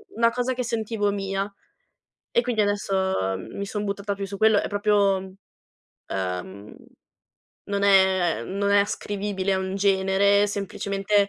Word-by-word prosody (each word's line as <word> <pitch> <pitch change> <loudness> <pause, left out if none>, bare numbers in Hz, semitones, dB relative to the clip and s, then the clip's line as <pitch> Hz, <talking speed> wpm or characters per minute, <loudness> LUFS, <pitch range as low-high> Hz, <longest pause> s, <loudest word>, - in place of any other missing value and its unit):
una 230 0 +4
cosa 250 +1 -1
che 250 - -2
sentivo 220 -3 -1
mia 195 0 -3 0.8
e - - +3
quindi 240 -2 -2
adesso 190 - 0
mi 200 - -6
son 210 +1 -4
buttata 200 0 -3
più 200 - -4
su 200 +1 -7
quello. 220 0 +4
È - - -2
proprio, 205 -1 +2
mhmm, 190 0 -10 0.7
ehm, 95 +2 -5 0.9
non 200 0 -1
è 190 -3 +4
non 200 +1 -2
è 200 0 +6
ascrivibile 200 -1 -2
a 190 - 0
un 190 0 -3
genere, 200 +1 +3
semplicemente 200 0 -3
200 Hz, 145 wpm, -24 LUFS, 190-205 Hz, 0.9 s, è